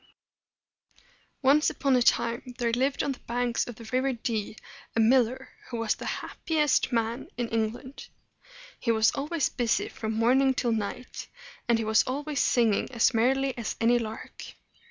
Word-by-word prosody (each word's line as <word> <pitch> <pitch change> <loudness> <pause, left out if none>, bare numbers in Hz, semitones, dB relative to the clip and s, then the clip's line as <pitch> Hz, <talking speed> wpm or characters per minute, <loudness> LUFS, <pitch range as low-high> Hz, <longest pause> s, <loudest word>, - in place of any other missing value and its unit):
Once 285 +4 +5
upon 275 -2 +1
a 250 - +3
time 235 +1 +1
there 235 -1 0
lived 265 +4 0
on 285 - 0
the 265 - -7
banks 240 0 -1
of 240 - -7
the 230 0 -12
River 260 +1 +1
Dee 225 -3 -3 0.4
a - - +1
miller, 245 +2 +3 0.2
who 240 - -4
was 230 -1 +1
the - - -8
hap - - -6
pi 325 - 0
est 300 -3 +2
man 230 +1 -1
in 240 -1 -1
England. 230 +4 -3 0.7
He 230 - 0
was 220 -1 +4
always 295 +2 -1
busy 240 -3 0
from 220 0 -4
morning 260 +4 +3
till 240 -2 0
night, 225 +3 -4 0.4
and 235 - +4
he 225 - -2
was 220 0 +4
always 285 +2 -2
singing 230 -3 +2
as 240 +1 +3
merrily 265 +3 +1
as 235 -3 -4
any 240 +1 +3
lark. 220 -1 -7
240 Hz, 170 wpm, -27 LUFS, 225-265 Hz, 0.7 s, Once